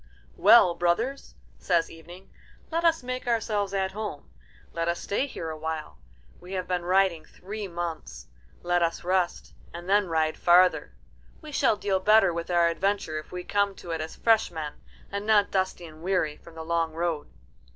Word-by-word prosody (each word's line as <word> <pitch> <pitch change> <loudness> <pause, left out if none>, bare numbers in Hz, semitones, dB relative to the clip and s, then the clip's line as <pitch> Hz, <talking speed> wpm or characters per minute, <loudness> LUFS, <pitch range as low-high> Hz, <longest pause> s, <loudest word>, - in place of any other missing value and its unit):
"Well, 175 - +7
brothers," 220 +12 -1 0.2
says 170 -3 +1
Evening, 175 +3 -13 0.4
"let 335 +1 0
us 330 -4 +3
make 255 0 -5
ourselves 215 -4 0
at 190 -1 -1
home. 205 -7 -6 0.4
Let 165 0 -2
us 170 0 0
stay 235 +8 -1
here 165 - -6
awhile. 155 0 -5 0.4
We 180 +2 -10
have 185 -1 -3
been 180 -1 -1
riding 185 -3 +2
three 205 +2 -7
months. 170 - -6 0.4
Let 175 0 +1
us 170 -1 -1
rest, 180 0 -1 0.2
and 175 +1 -9
then 205 0 +3
ride 160 -1 0
farther. 180 +1 +4 0.4
We 310 -2 -10
shall 275 - +2
deal 195 -2 0
better 195 -2 +5
with 170 +1 -4
our 175 -1 +4
adventure 190 -2 -1
if 155 - -13
we 180 0 -5
come 200 0 0
to 175 - -9
it 165 -1 -2
as 155 - -6
fresh 225 -1 +3
men, 155 -3 -7 0.3
and 200 0 -3
not 210 -2 +4
dusty 185 -2 -1
and 155 -1 -13
weary 180 -4 0
from 165 +1 -16
the 160 0 -7
long 165 -1 0
road." 165 -2 -2
180 Hz, 175 wpm, -27 LUFS, 165-200 Hz, 0.4 s, Well